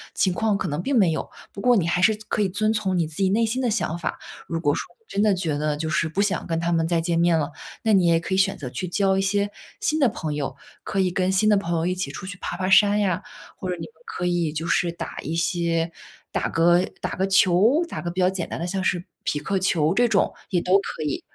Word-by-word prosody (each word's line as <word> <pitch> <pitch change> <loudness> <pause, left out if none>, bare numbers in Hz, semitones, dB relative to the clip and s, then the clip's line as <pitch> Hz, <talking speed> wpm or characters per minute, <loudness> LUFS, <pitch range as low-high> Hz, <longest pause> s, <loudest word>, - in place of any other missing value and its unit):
情 185 - +2
况 215 +1 +1
可 190 - -3
能 150 0 -2
并 270 +6 0
没 190 -7 +4
有。 160 - -3 0.2
不 200 - -7
过 245 +2 +4
你 190 -7 +2
还 175 +1 +1
是 220 +3 +5
可 - - 0
以 200 - +2
遵 215 +3 +1
从 195 -4 0
你 170 - +2
自 155 0 -7
己 195 -1 +2
内 225 +4 +2
心 240 +4 -1
的 250 - +1
想 190 -6 -1
法， - - -3 0.3
如 165 -1 -2
果 145 -3 +2
说 - - -5
真 200 - -1
的 210 -2 +4
觉 170 -5 -1
得 150 0 -1
就 160 +1 -3
是 165 0 +1
不 165 - -4
想 195 -4 -1
跟 165 -1 -1
他 170 +1 -1
们 165 -1 +1
再 170 0 +1
见 165 0 0
面 170 -1 +4
了， 155 0 -1 0.3
那 220 - +3
你 185 -3 +4
也 165 -1 +4
可 170 - -4
以 - - +2
选 195 0 +2
择 145 - -6
去 185 - -4
交 190 +2 +1
一 195 - +1
些 200 +1 0 0.3
新 310 - 0
的 270 -5 +4
朋 155 -7 -4
友。 140 -2 -3 0.3
可 195 - -2
以 185 -1 +2
跟 185 +1 +1
新 190 +3 +3
的 210 - +5
朋 175 -3 -1
友 165 - 0
一 180 - +1
起 180 -6 -3
出 165 +7 -7
去 185 -1 -6
爬 175 - -4
爬 185 0 -1
山 205 +2 +5
呀， 195 -2 0 0.4
或 185 - -4
者 180 - -1
你 - - -10
们 - - -15
可 180 - -4
以 175 -3 +1
就 160 +1 -3
是 170 0 +1
打 170 - -7
一 160 - -4
些 170 -1 0 0.4
打 - - -1
个 175 +2 +4 0.2
打 - - -3
个 190 +1 -1
球， 195 - +4
打 - - -5
个 175 - -3
比 175 +2 -5
较 180 - +4
简 190 -3 -4
单 - - -5
的 170 - -2
像 190 +1 -2
是 175 -1 0 0.2
匹 - - -1
克 190 +6 -1
球 165 -4 +2
这 240 +4 +3
种， - - +2 0.2
也 180 -3 +1
都 185 +3 +4
可 160 - -5
以。 150 -2 -2
180 Hz, 300 characters per minute, -24 LUFS, 165-200 Hz, 0.4 s, 是